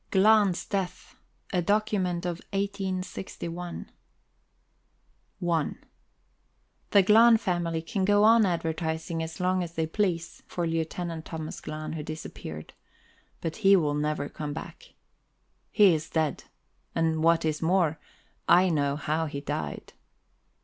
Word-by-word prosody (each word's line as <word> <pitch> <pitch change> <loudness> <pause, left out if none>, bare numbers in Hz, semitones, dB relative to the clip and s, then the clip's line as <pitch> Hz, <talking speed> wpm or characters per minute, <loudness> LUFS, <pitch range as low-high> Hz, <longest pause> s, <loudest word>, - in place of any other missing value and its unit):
GLAHN'S 200 -2 +4
DEATH 195 -3 -4 0.4
A 180 - +2
DOCUMENT 190 -3 0
OF 175 -1 -2
1861 185 -3 -4 1.6
I 165 -3 +2 1.2
The 200 - +6
Glahn 225 +4 +7
family 175 -5 -1
can 190 +4 -2
go 205 +1 +4
on 225 +1 +6
advertising 165 -2 -2
as 160 0 -6
long 185 0 +1
as 170 -1 -5
they 160 - 0
please 170 -1 -2
for 175 - -2
Lieutenant 165 0 -3
Thomas 160 -1 -6
Glahn, 155 0 -5
who 160 - -4
disappeared; 145 - -8 0.7
but 165 -1 -4
he 200 -2 +6
will 155 -6 +2
never 150 0 -1
come 150 -1 -5
back. 160 - -10 0.7
He 205 -5 +6
is 155 0 -3
dead, 155 -3 -1 0.5
and, 160 -1 +1
what 165 0 +4
is 155 -1 -1
more, 165 -2 +2 0.5
I 180 +2 +6
know 145 -3 +1
how 155 +2 -1
he 140 -1 -5
died. 75 - -5
170 Hz, 125 wpm, -27 LUFS, 160-190 Hz, 1.6 s, Glahn